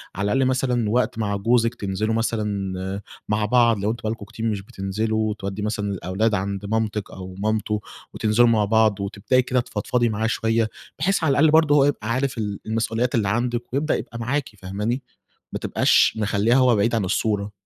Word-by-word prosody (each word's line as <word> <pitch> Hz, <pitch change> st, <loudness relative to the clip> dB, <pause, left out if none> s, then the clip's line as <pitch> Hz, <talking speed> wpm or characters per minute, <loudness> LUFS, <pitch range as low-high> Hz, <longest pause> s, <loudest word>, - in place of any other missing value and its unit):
على 100 Hz, +2 st, -2 dB
الأقل 135 Hz, 0 st, +2 dB
مثلًا 125 Hz, -4 st, 0 dB
وقت 120 Hz, +1 st, +1 dB
مع 100 Hz, -2 st, 0 dB
جوزِك 115 Hz, +3 st, +2 dB
تنزلوا 105 Hz, +1 st, -2 dB
مثلًا 100 Hz, -4 st, -2 dB, 0.3 s
مع 105 Hz, 0 st, +1 dB
بعض 115 Hz, -1 st, +3 dB
لو 105 Hz, +2 st, 0 dB
أنتم 115 Hz, -, -6 dB
بقى 110 Hz, -, -1 dB
لكم 115 Hz, -3 st, -6 dB
كتير 115 Hz, +2 st, -6 dB
مش 105 Hz, -3 st, -1 dB
بتنزلوا، 110 Hz, +3 st, -2 dB
وتودّي 100 Hz, -1 st, -4 dB
مثلًا 105 Hz, -1 st, -2 dB
الأولاد 100 Hz, +4 st, -1 dB
عند 100 Hz, +1 st, -2 dB
مامتِك 110 Hz, -1 st, -2 dB
أو 95 Hz, -1 st, -9 dB
مامته 105 Hz, 0 st, -1 dB, 0.3 s
وتنزلوا 115 Hz, +2 st, +3 dB
مع 110 Hz, -2 st, +3 dB
بعض، 110 Hz, -1 st, +3 dB
وتبدئي 105 Hz, +6 st, +1 dB
كده 125 Hz, 0 st, 0 dB
تفضفضي 120 Hz, +1 st, 0 dB
معاه 110 Hz, +1 st, -1 dB
شوية، 115 Hz, 0 st, +1 dB, 0.3 s
بحيث 180 Hz, +2 st, +1 dB
على 150 Hz, -, +3 dB
الأقل 150 Hz, +3 st, +4 dB
برضه 155 Hz, -2 st, +5 dB
هو 140 Hz, -1 st, +5 dB
يبقى 115 Hz, -6 st, -1 dB
عارف 130 Hz, 0 st, -1 dB
ال 105 Hz, -2 st, -3 dB
المسؤوليات 115 Hz, +3 st, -1 dB
اللي 105 Hz, -4 st, +1 dB
عندِك 120 Hz, +2 st, -2 dB
ويبدأ 145 Hz, +3 st, +1 dB
يبقى 115 Hz, -, -6 dB
معاكِ، 135 Hz, +4 st, -1 dB
فهماني؟ 105 Hz, +7 st, -3 dB, 0.5 s
ما -, -, -2 dB
تبقاش -, -, +3 dB
مخلّياه 105 Hz, +2 st, +2 dB
هو 130 Hz, -3 st, +5 dB
بعيد 115 Hz, +3 st, +1 dB
عن 105 Hz, -, 0 dB
الصورة. 100 Hz, +2 st, -1 dB
110 Hz, 185 wpm, -23 LUFS, 100-120 Hz, 0.5 s, برضه